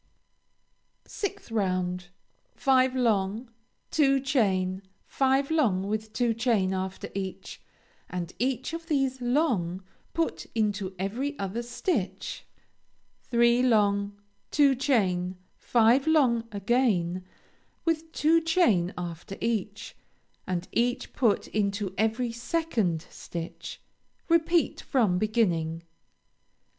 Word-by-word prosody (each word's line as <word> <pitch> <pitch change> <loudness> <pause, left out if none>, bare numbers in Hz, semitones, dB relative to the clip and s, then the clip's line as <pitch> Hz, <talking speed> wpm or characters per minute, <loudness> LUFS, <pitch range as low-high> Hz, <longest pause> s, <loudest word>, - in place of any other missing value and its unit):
6th 400 - -5
round 185 -4 -1 0.5
Five 260 -1 +3
long, 225 -1 0 0.4
two 275 -3 +4
chain, 195 -9 +1 0.2
five 270 +2 +1
long 225 -13 +2
with 215 +1 -3
two 235 +1 +1
chain 220 -5 +1
after 190 0 -4
each, 190 -1 -6 0.5
and 180 -1 -4
each 260 +4 -1
of 330 0 -6
these 270 -4 0
long 240 - 0 0.3
put 330 0 -1
into 205 -3 -1
every 245 - -3
other 195 +4 -3
stitch, 235 - -3 0.7
three 235 0 +3
long, 205 -4 +2 0.3
two 285 -2 +4
chain, 190 -9 +1 0.2
five 240 +4 +3
long 250 -8 +3
again 200 -5 +1 0.6
with 325 -1 -1
two 325 +2 +3
chain 280 - +3
after 175 +2 -6
each, 215 -2 -3 0.5
and 180 -1 -2
each 245 +1 0
put 225 -6 +2
into 200 -2 -1
every 225 +3 0
second 230 - -1
stitch; 170 -1 -7 0.5
repeat 335 0 +2
from 210 -9 +1
beginning. 170 -7 0
225 Hz, 100 wpm, -27 LUFS, 190-265 Hz, 0.7 s, two